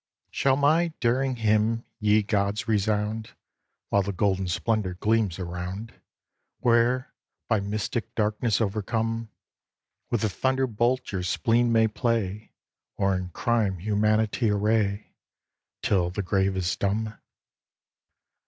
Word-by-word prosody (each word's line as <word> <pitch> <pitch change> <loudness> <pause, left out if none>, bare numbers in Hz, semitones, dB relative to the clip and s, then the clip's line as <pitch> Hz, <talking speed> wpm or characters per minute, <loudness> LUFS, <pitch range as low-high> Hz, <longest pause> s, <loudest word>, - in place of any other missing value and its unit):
Shall 135 -1 +2
my 155 +5 +3
daring 130 +2 +1
hymn, 110 +1 +1
ye 105 0 +3
gods, 100 +1 -1
resound, 110 +1 0 0.6
While 100 - +3
the 100 +1 -2
golden 95 0 0
splendor 95 +1 -1
gleams 105 -2 +1
around, 90 +4 -5 0.6
Where, 120 +2 +2 0.3
by 110 -3 +2
mystic 110 +4 -3
darkness 110 0 +1
overcome, 115 +2 -1 0.8
With 120 - 0
the 110 - +2
thunderbolt 130 +1 0
your 95 -2 -2
spleen 115 +6 +2
may 115 -1 +4
play, 110 -2 -2 0.5
Or 95 -1 +2
in 90 -1 -3
crime 110 -1 0
humanity 110 +4 +1
array, 105 0 0 0.7
Till 90 -4 +2
the 100 +3 -3
grave 95 +1 +1
is 90 0 0
dumb? 105 +2 -2
110 Hz, 115 wpm, -26 LUFS, 100-115 Hz, 0.8 s, may